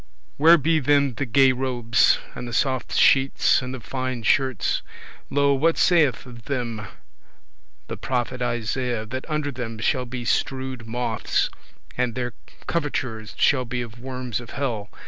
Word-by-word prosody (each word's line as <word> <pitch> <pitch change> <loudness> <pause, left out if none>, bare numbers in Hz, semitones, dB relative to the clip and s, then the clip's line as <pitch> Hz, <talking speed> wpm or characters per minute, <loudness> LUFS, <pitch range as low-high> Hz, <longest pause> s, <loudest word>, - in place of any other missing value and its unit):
Where 165 +4 +7
be 160 +2 +2
then 140 -1 +3
the 135 +3 -3
gay 130 +3 +5
robes, 125 -2 +2 0.2
and 125 - -7
the 120 - -7
soft 130 +2 0
sheets, 135 0 +4
and 125 0 -5
the 130 - -6
fine 130 0 -4
shirts? 130 +2 +1 0.5
Lo, 140 0 +3
what 160 +5 +2
saith 150 -6 +3
of 120 -3 -12
them 120 -7 -3 1.0
the - - -5
prophet 125 0 -2
Isaiah, 120 -1 -1
that 130 +7 -6
under 150 -1 -1
them 120 -3 -5
shall 125 +3 0
be 120 0 -6
strewed 130 -1 -1
moths, 115 -1 -1 0.5
and 125 -2 0
their 125 -1 -3 0.3
covertures 130 -9 -3
shall 130 -2 +3
be 125 0 -3
of 120 0 -11
worms 125 -2 -4
of 120 - -11
hell. 115 -7 -2
125 Hz, 150 wpm, -24 LUFS, 120-135 Hz, 1.0 s, Where